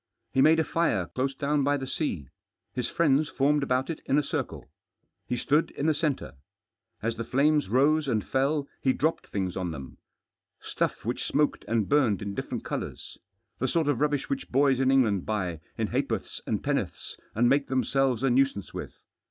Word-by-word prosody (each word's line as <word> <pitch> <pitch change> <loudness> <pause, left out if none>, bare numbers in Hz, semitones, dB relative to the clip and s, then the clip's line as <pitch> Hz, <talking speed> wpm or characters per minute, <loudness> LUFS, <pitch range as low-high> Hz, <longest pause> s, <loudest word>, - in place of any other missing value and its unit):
He 130 - +4
made 160 +3 +6
a - - +3
fir§ 155 - 0
close 135 +1 -1
down 145 +1 +1
by 145 +1 +2
the 135 - -4
sea. 90 - -3 0.4
His 125 -2 -2
friends 150 -2 +2
formed 145 +2 +2
about 130 -1 0
it 165 - -7
in 140 - +3
a 150 - +3
circle. - - -4 0.6
He 125 - -1
stood 150 +6 +2
in 140 - -4
the 160 - +4
centre. 150 -3 -2 0.7
As 115 0 -1
the 115 - -2
flames 145 +1 +2
rose 145 +6 +3
and 110 -5 0
fell 140 +2 0
he 130 - +3
dropped 160 +2 -1
things 95 -3 -2
on 90 -2 -2
them, 70 -5 -8 0.6
stuff - - -2
which - - -2
smoked - - +1
and 110 -3 +1
burned 125 -10 +2
in 100 -1 -4
different - - -4
colours. - - -5 0.4
The 130 - +1
sort 160 +3 +1
of 145 -4 +1
rubbish 150 -2 +1
which 140 -1 -3
boys 135 0 +3
in 135 0 +3
England 115 -9 +3
buy 90 -7 -2 0.2
in - - -1
ha'porths - - -2
and - - -1
penn'orths, - - -2 0.2
and 120 +3 +4
make 140 +2 +3
themselves 130 -1 +1
a 135 - +3
nuisance 130 -6 +1
with. - - -6
135 Hz, 185 wpm, -27 LUFS, 115-145 Hz, 0.7 s, made